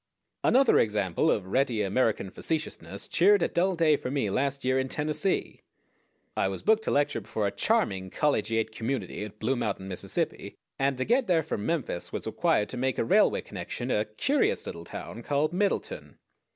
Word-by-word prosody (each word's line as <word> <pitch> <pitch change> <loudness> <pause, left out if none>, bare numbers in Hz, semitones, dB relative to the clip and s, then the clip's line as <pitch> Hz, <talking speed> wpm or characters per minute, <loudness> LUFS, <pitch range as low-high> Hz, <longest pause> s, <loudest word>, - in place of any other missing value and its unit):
Another 265 0 +5
example 105 -5 +1
of 100 - +1
ready 115 +1 +1
American 100 -1 0
facetiousness 155 +5 -3
cheered 195 +2 +4
a - - +3
dull 185 +2 +1
day 160 -3 +4
for 125 - -5
me 130 -7 -1
last 140 +3 -1
year 130 +1 +2
in 130 0 -2
Tennessee. 155 +7 -1 0.7
I - - +1
was 95 0 -4
booked 220 0 +3
to - - 0
lecture 145 -4 +1
before 105 +1 -3
a 100 - 0
charming 100 - 0
collegiate 115 -4 0
community 110 -3 -3
at 105 0 -11
Blue 120 +5 0
Mountain, 105 -5 -3
Mississippi, 90 -2 -2 0.2
and 135 -1 +1
to 130 - -1
get 245 +2 +2
there 165 -3 +3
from 110 -9 -3
Memphis 145 - -2
was - - -4
required 105 - +1
to 130 - -6
make 130 +1 0
a - - 0
railway - - +4
connection - - -5
at 105 - +2
a - - -2
curious 270 - 0
little 85 0 -7
town 85 +8 -7
called 145 +6 0
Middleton. 205 - -2
130 Hz, 180 wpm, -28 LUFS, 105-160 Hz, 0.7 s, Another